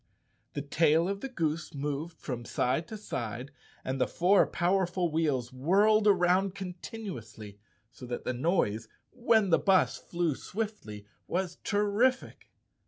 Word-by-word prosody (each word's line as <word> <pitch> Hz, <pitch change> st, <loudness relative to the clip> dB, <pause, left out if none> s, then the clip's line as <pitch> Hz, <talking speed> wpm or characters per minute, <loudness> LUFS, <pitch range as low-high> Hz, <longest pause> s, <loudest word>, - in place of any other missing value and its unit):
The 145 Hz, -, -3 dB
tail 160 Hz, +3 st, +3 dB
of 200 Hz, +1 st, -3 dB
the 270 Hz, -, -4 dB
goose 160 Hz, -, -2 dB
moved 150 Hz, +4 st, -4 dB
from 125 Hz, -4 st, -5 dB
side 130 Hz, +7 st, -1 dB
to 220 Hz, -, -7 dB
side, 125 Hz, -, -5 dB, 0.3 s
and 130 Hz, 0 st, -2 dB
the 125 Hz, -, +3 dB
four 185 Hz, +3 st, +4 dB
powerful 180 Hz, -1 st, 0 dB
wheels 145 Hz, -6 st, 0 dB
whirled 205 Hz, +10 st, +3 dB
around 185 Hz, 0 st, +3 dB
continuously, 180 Hz, -, -8 dB, 0.3 s
so 125 Hz, 0 st, -11 dB
that 120 Hz, -, -4 dB
the 125 Hz, -, -2 dB
noise, 120 Hz, -, 0 dB, 0.2 s
when 225 Hz, -5 st, +2 dB
the 165 Hz, -, +5 dB
bus 190 Hz, -2 st, +3 dB
flew 170 Hz, -3 st, -1 dB
swiftly, 190 Hz, -, -6 dB, 0.2 s
was 180 Hz, -1 st, -2 dB
terrific. 210 Hz, +5 st, 0 dB
170 Hz, 135 wpm, -30 LUFS, 135-200 Hz, 0.3 s, the